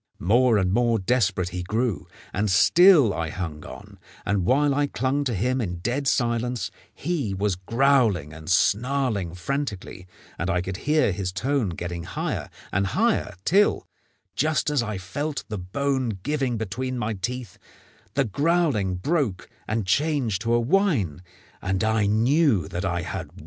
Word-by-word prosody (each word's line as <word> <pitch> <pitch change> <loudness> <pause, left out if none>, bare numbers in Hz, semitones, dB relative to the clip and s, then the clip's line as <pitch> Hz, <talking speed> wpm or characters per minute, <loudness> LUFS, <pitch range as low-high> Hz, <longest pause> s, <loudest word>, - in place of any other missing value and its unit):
More 115 +4 +3
and 95 -2 +1
more 120 0 +2
desperate 95 -4 +1
he 90 0 -4
grew, 110 +3 -1 0.3
and 105 +2 0
still 155 - +6
I 80 -2 -2
hung 80 -4 -5
on; - - -11 0.3
and 100 -3 0
while 140 +5 +3
I 145 +1 +1
clung 135 +2 -1
to 125 -4 -1
him 125 +7 0
in 90 -6 -3
dead 125 +10 -2
silence 120 -4 0 0.2
he 145 - -2
was 100 +1 0
growling 110 - +2
and 80 +1 -9
snarling 105 -2 +1
frantically, 100 -4 -4 0.3
and 85 - -1
I 90 -2 +1
could 90 +1 -4
hear 150 -8 +3
his 95 -1 -3
tone 125 +4 0
getting 85 0 -5
higher - - -3 0.2
and 100 0 +1
higher 210 - 0
till, 200 +5 +3 0.5
just 155 +1 +1
as 145 -4 +2
I 110 -3 -3
felt 145 - -4
the 105 -2 -4
bone 130 +3 -1
giving 135 -3 -1
between 125 +5 -3
my 110 -1 -2
teeth, 120 +5 -5 0.6
the 140 0 +2
growling 140 - +1
broke 125 - -1 0.2
and 110 -1 -1
changed 135 -2 +1
to 115 +1 0
a - - +3
whine, 120 - +1 0.4
and 95 +1 -1
I 110 -1 +2
knew 115 - +3
that 90 0 -3
I 85 -1 -1
had - - -6
won. - - -14
115 Hz, 160 wpm, -24 LUFS, 95-140 Hz, 0.6 s, still